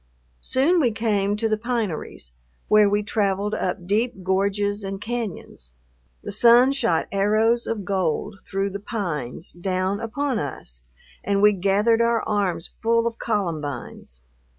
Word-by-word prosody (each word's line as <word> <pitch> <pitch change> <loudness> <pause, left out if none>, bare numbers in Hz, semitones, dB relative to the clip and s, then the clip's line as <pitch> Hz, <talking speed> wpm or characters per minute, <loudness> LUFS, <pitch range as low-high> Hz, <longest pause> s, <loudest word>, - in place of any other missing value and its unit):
Soon 310 - +2
we 250 -7 +3
came 210 -2 0
to 225 +1 0
the 215 -1 0
pineries, 215 - -4 0.4
where 210 -1 +5
we 205 +1 +1
traveled 205 -1 0
up 180 -1 -2
deep 210 +1 -1
gorges 200 +2 0
and 195 0 -4
cañons. 210 - -6 0.5
The - - -5
sun 240 +5 +6
shot 175 - 0
arrows 215 +4 +2
of 215 -4 -3
gold 190 +1 -1
through 195 0 -2
the 200 - -5
pines 170 - -4
down 185 +2 -2
upon 255 +3 -2
us - - -7 0.4
and 200 0 +1
we 210 +1 +6
gathered 205 +4 +2
our 235 -1 +2
arms 200 -6 -1
full 230 0 +2
of 230 0 -3
columbines. 155 - -4
205 Hz, 140 wpm, -23 LUFS, 190-230 Hz, 0.5 s, sun